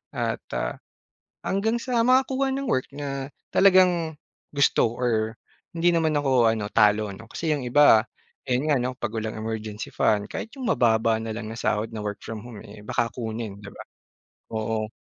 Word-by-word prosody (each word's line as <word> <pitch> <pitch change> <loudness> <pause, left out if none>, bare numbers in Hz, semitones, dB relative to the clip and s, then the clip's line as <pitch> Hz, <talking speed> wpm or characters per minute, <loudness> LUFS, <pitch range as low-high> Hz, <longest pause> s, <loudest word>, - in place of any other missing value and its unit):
at - - -1 0.2
ah, - - -2 0.7
hanggang 215 +4 0
sa 245 -3 +1
makakuha 265 +1 +3
ng 275 0 -3
work, 130 - +1
na 140 -2 -4 0.3
talagang 180 -4 +5 0.4
gusto 140 -4 +3
or 110 -3 0 0.4
hindi 170 +1 +3
naman 160 -1 +2
ako 130 -5 +3
ano 110 -2 -2
talo 105 0 +4
ano, 110 +4 -11
kasi 165 - -3
yung 145 - -3
iba 125 -3 +6 0.5
ayun 125 +3 +1
nga 145 - +4
'no 125 +1 -2
pag 120 -2 -3
walang 110 0 -3
emergency 110 -1 -5
fund, 105 -1 +2
kahit 225 - -5
yung 255 - -4
mababa 110 -1 +3
na 115 - -4
lang 110 -1 -5
na - - -6
sahod 110 0 0
na 105 - -4
work 105 -1 -3
from 110 -2 -6
home, 120 -4 -9
eh, 105 0 -12
baka 115 +2 0
kunin 110 -4 -5
di 100 - -9
ba? - - -10 0.7
Oo. 110 0 -1
115 Hz, 175 wpm, -25 LUFS, 110-155 Hz, 0.7 s, iba